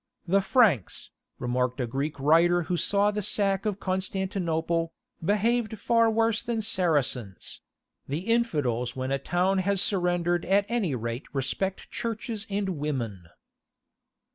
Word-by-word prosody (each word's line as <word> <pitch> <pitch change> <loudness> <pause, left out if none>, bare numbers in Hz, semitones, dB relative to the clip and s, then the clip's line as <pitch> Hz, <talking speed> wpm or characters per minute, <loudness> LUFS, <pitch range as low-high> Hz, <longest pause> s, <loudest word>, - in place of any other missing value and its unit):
"The 195 +3 +3
Franks," 190 - +2 0.3
remarked 125 +1 -1
a 125 - 0
Greek 140 +5 -3
writer 170 +5 +4
who 175 - -1
saw 200 +4 +2
the 210 0 -2
sack 200 0 +1
of 205 -1 -2
Constantinople, 185 -4 -1 0.3
"behaved 220 +4 +1
far 230 +2 +3
worse 225 0 +2
than 230 -2 -2
Saracens; 145 - -1 0.5
the 145 +5 -2
infidels 150 - 0
when 130 0 -3
a 135 - +1
town 180 +6 +1
has 195 +1 +1
surrendered 175 -3 +1
at 200 +2 +3
any 210 - 0
rate 115 +2 -4
respect 165 +8 -2
churches 225 -1 -4
and 195 -5 -2
women." 115 - -3
180 Hz, 130 wpm, -27 LUFS, 140-205 Hz, 0.5 s, writer